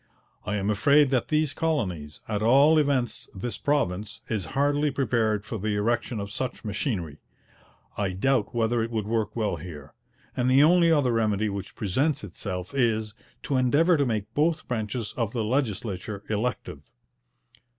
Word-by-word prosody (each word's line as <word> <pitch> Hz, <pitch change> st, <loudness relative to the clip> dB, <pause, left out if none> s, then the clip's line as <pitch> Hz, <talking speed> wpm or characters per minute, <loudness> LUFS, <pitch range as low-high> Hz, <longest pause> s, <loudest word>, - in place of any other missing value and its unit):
I 100 Hz, -, 0 dB
am 100 Hz, +1 st, 0 dB
afraid 140 Hz, +7 st, +4 dB
that 130 Hz, -3 st, +1 dB
these 155 Hz, -2 st, +1 dB
colonies, 90 Hz, -, -2 dB
at 105 Hz, -2 st, -2 dB
all 140 Hz, +8 st, +5 dB
events 135 Hz, -6 st, 0 dB
this 115 Hz, +5 st, -4 dB
province, 110 Hz, -, -1 dB
is 105 Hz, -6 st, -1 dB
hardly 145 Hz, +1 st, +2 dB
prepared 115 Hz, -6 st, 0 dB
for 110 Hz, -1 st, -5 dB
the 105 Hz, +1 st, -1 dB
erection 115 Hz, +2 st, 0 dB
of 100 Hz, 0 st, -5 dB
such 125 Hz, +1 st, -4 dB
machinery: 95 Hz, -, -3 dB, 0.8 s
I 100 Hz, -2 st, 0 dB
doubt 120 Hz, +4 st, 0 dB
whether 115 Hz, 0 st, +1 dB
it 115 Hz, -, -2 dB
would 110 Hz, -3 st, -2 dB
work 110 Hz, -1 st, -1 dB
well 105 Hz, -6 st, -1 dB
here: 75 Hz, -3 st, -10 dB, 0.4 s
and 125 Hz, 0 st, +1 dB
the 135 Hz, +2 st, +6 dB
only 170 Hz, +1 st, +5 dB
other 145 Hz, -6 st, +3 dB
remedy 110 Hz, -2 st, +1 dB
which 100 Hz, -1 st, -6 dB
presents 130 Hz, -, 0 dB
itself 90 Hz, -1 st, -5 dB
is, 110 Hz, -5 st, +1 dB, 0.3 s
to 135 Hz, -, 0 dB
endeavour 145 Hz, +8 st, +4 dB
to 145 Hz, -2 st, +2 dB
make 110 Hz, -1 st, -3 dB
both 155 Hz, +3 st, +1 dB
branches 110 Hz, -1 st, -3 dB
of 115 Hz, -3 st, -1 dB
the 115 Hz, -3 st, -1 dB
legislature 105 Hz, -4 st, -2 dB
elective.' 110 Hz, +4 st, -2 dB
115 Hz, 160 wpm, -26 LUFS, 105-135 Hz, 0.8 s, the